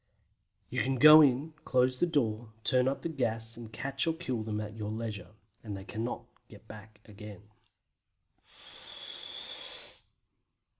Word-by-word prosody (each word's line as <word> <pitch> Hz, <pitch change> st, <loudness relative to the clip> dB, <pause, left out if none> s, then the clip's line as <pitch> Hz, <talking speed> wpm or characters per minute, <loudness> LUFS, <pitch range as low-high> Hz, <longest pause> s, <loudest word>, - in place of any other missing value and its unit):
You 130 Hz, 0 st, 0 dB
can 130 Hz, +4 st, +1 dB
then -, -, -4 dB
go 155 Hz, +3 st, +11 dB
in, 145 Hz, +2 st, +3 dB
close 130 Hz, 0 st, +2 dB
the 175 Hz, -, +3 dB
door, 120 Hz, -8 st, 0 dB
turn 125 Hz, -1 st, +3 dB
up 135 Hz, -, -1 dB
the -, -, 0 dB
gas 115 Hz, -6 st, -1 dB
and 115 Hz, -2 st, -9 dB
catch 135 Hz, +7 st, -2 dB
or 165 Hz, -, +1 dB
kill 130 Hz, -9 st, -3 dB
them 110 Hz, -1 st, -3 dB
at 105 Hz, 0 st, -6 dB
your 105 Hz, -2 st, -4 dB
leisure, 110 Hz, -1 st, -5 dB, 0.3 s
as 105 Hz, -3 st, -5 dB
they 95 Hz, -, -7 dB
cannot 110 Hz, +4 st, -4 dB, 0.3 s
get -, -, -15 dB
back 110 Hz, 0 st, -12 dB
again. 105 Hz, -2 st, -11 dB
115 Hz, 145 wpm, -31 LUFS, 110-135 Hz, 0.3 s, go